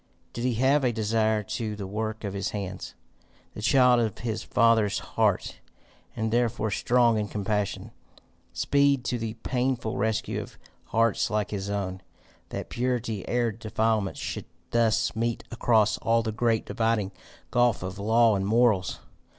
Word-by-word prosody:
Did 120 - -3
he 125 -2 +1
have 135 +4 +3
a 125 - +3
desire 110 -1 +1
to 110 +1 -4
the 100 -2 -6
work 110 +3 -4
of 100 -2 -3
his 100 -1 -2
hands, 100 -3 -6 0.6
the - - -7
child 125 +2 +5
of 110 -4 -1
his 110 -2 -3
father's 110 -4 +3
heart, - - -1 0.6
and 110 -1 -1
therefore, 115 -3 +1
strong 120 0 +3
in 105 - -2
compassion, 105 -1 -2 0.6
speed 140 -2 +2
to 120 -1 -1
the 110 0 -4
painful 125 -3 -1
rescue 110 +2 -1
of - - -11 0.3
hearts 115 0 +1
like 105 -1 -1
his 100 -1 -3
own? 95 -2 -3 0.5
That - - -6
purity 120 -4 -2
arid 120 -3 0
defilement 110 -2 0
should - - -5 0.3
thus 115 -3 +2
meet 115 +1 -1
across 115 -3 +2
all 115 0 +2
the 110 - -2
great 115 0 +1
dividing 110 -4 0 0.4
gulf 120 -5 +2
of 95 +2 -6
law 110 +1 +4
and 95 - -1
morals! 110 -4 +2
110 Hz, 150 wpm, -27 LUFS, 105-120 Hz, 0.6 s, child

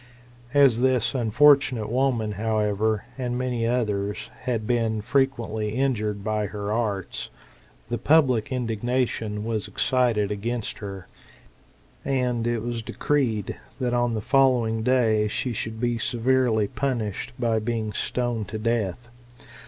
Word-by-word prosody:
As 135 -5 +6
this 130 -3 +2
[unfortunate] 130 -1 +4
woman, 125 -4 +1
however, 105 0 0
and 125 -1 -2
many 125 -2 -1
others, 105 -4 -1
had 115 -4 -1
been 115 -2 +1
frequently 110 -3 0
injured 110 -6 0
by 105 -1 -1
her 105 0 -4
arts, 105 -5 -2 0.6
the 120 0 -3
public 130 -5 +3
indignation 115 -3 -1
was 110 -3 -2
excited 120 -5 +1
against 110 +2 -3
her; 95 -3 -7 1.0
and 125 -4 0
it 120 -2 -1
was 120 -1 -3
decreed, 115 -4 -1 0.2
that 125 -2 0
on 120 -1 +1
the 110 - -2
following 120 -3 +3
day 110 -3 +3
she 120 +4 -2
should 110 0 -4
be 120 -1 0
severely 120 -3 +2
punished, 120 -3 -3
by 115 -3 +1
being 110 -1 -2
stoned 120 -4 -2
to 110 - -5
death. 115 0 -1
115 Hz, 125 wpm, -25 LUFS, 105-125 Hz, 1.0 s, As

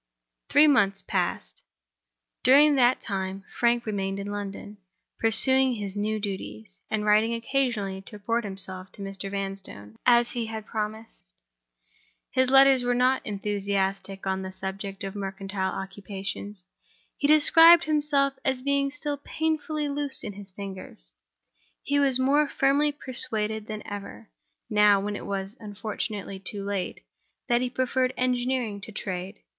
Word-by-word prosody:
Three 295 +1 +6
months 200 -9 +3
passed. - - -2 0.8
During 290 +4 +7
that 255 -2 +3
time 190 -1 -3 0.2
Frank 235 0 +2
remained 195 -2 -2
in 200 +1 -5
London; 205 0 -6 0.4
pursuing 260 +3 +4
his 200 -2 -5
new 215 +1 -1
duties, 200 0 -6
and 215 -1 -1
writing 215 +2 +3
occasionally 230 -6 -1
to - - -10
report 230 +3 -1
himself 190 -2 -5
to 200 - -9
Mr. 195 0 -5
Vanstone, 195 - -6
as 240 -1 +5
he 235 -2 -3
had 220 -1 -6
promised. 220 +1 -5 1.1
His 260 0 +3
letters 270 -1 +6
were 245 0 +1
not 255 +2 +2
enthusiastic 195 -1 -2
on 190 0 -1
the 190 0 -6
subject 195 +1 -6
of 195 -1 -4
mercantile 195 -1 -3
occupations. 195 0 -6 0.5
He 285 - 0
described 325 +3 +7
himself 295 -2 +2
as 260 -1 -1
being 280 0 +1
still 290 0 -4
painfully 305 0 -2
loose 285 -1 -3
in 205 - -5
his 200 0 -10
figures. 185 - -6 0.7
He 285 0 +1
was 270 -3 +3
also - - +1
more 290 +3 +3
firmly 285 +1 +2
persuaded 220 -6 -1
than 215 -1 -6
ever—now 205 0 -1
when 205 +1 -3
it - - -7
was 195 +3 -4
unfortunately 205 -2 -5
too 200 +1 -4
late—that 205 +4 -4
he 255 - -1
preferred 255 0 0
engineering 250 -4 0
to 220 - -9
trade. 190 -1 -5
215 Hz, 140 wpm, -26 LUFS, 195-260 Hz, 1.1 s, During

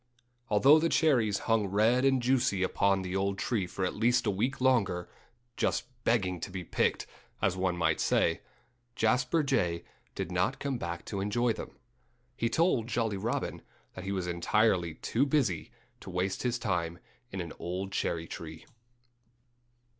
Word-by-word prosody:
Although 135 +9 +6
the 165 +1 +1
cherries 120 -13 +3
hung 115 -3 +2
red 110 +6 +3
and 135 -2 +3
juicy 125 -6 +2
upon 95 0 +2
the 90 0 -4
old 100 0 0
tree 100 -3 -1
for 95 +1 -3
at - - -1
least 120 +3 +2
a 105 - +2
week 120 +8 -1
longer, 100 -9 +2 0.5
just - - 0 0.2
begging 95 -6 +1
to 90 - -5
be 90 -1 -5
picked - - 0 0.3
as 95 -1 +1
one 90 -1 0
might 80 -2 +1
say - - +2 0.5
Jasper 125 +7 +2
Jay 90 -12 0 0.3
did - - -4
not - - 0
come 135 -3 -2
back 85 -2 -5
to 100 -2 -3
enjoy 115 +4 +1
them. - - -9 0.6
He 115 -1 0
told 135 -5 +2
Jolly 115 -3 0
Robin - - -2 0.3
that 95 - -8
he 95 - -3
was 95 -2 -2
entirely 85 0 +1
too 115 +10 0
busy 135 - +1 0.3
to - - -10
waste 95 +1 -1
his 125 -1 0
time 85 -6 -2 0.3
in 95 - -5
an 85 -3 -5
old 95 +3 -4
cherry 85 -4 -1
tree. 80 0 -8
100 Hz, 160 wpm, -30 LUFS, 90-120 Hz, 0.6 s, Although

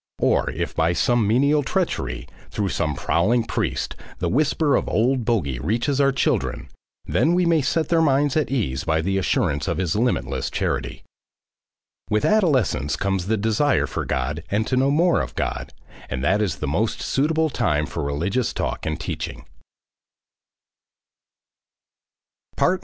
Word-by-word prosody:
Or - - +2
if - - -4
by 80 +2 +2
some 120 +3 +2
menial 140 +7 +3
treachery, 65 - -2 0.2
through 100 -2 -2
some 80 -4 -1
prowling 110 - +1
priest, - - -2 0.2
the - - -1
whisper 150 +2 +2
of - - 0
Old 125 +2 +1
Bogey 75 - 0
reaches 120 - 0
our 140 0 +4
children, 65 - -1 0.4
then 170 +2 +2
we 180 0 +2
may 165 -2 +3
set 155 +3 0
their 165 -1 +3
minds 145 -2 +2
at 155 -2 +1
ease 95 - -1
by 80 -2 +1
the 95 +3 0
assurance 95 - 0
of - - -1
his 90 -2 -1
limitless 120 +3 0
charity.... - - -3 1.1
With 105 0 +1
adolescence 140 - +2
comes 95 -2 -1
the 110 +1 +1
desire 110 +7 +2
for - - -4
God 70 +5 -2
and 105 +2 0
to 130 - -1
know 130 +2 +3
more 165 +4 +3
of - - -6
God, - - -3 0.4
and 65 +1 -3
that 95 +8 +2
is 95 -10 0
the - - -4
most 105 +11 -1
suitable 155 +2 +1
time 75 - +1
for 80 - -5
religious 85 - -1
talk - - -3
and 80 +1 -2
teaching. 65 -4 -5
110 Hz, 150 wpm, -23 LUFS, -, 1.1 s, our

